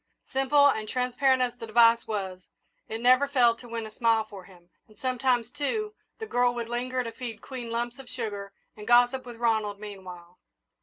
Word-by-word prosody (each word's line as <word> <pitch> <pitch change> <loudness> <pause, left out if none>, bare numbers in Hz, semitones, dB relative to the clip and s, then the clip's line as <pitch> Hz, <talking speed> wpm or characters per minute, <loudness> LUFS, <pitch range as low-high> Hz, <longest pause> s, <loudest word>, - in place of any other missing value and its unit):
Simple 270 +2 +4
and 215 -6 0
transparent 255 +1 +2
as 245 -1 -1
the 230 - -6
device 230 +1 +5
was, 190 -4 -4 0.5
it 225 - -4
never 255 +3 +5
failed 240 -4 +3
to 240 - -12
win 230 -1 -4
a 215 - -9
smile 225 -1 +2
for 200 -4 -11
him, 175 -2 -19 0.2
and 215 - -21
sometimes, 250 -2 0
too, 425 - -2 0.2
the 445 - -5
girl 245 - +1
would 235 -1 -4
linger 250 +1 -2
to 230 - -5
feed 230 -2 -7
Queen 245 -2 -7
lumps 240 +2 -3
of 265 - -11
sugar 205 -5 -5 0.2
and 210 -1 -11
gossip 245 +2 +4
with 240 - -8
Ronald 220 -3 0
meanwhile. 180 -4 -10
235 Hz, 190 wpm, -27 LUFS, 215-255 Hz, 0.5 s, device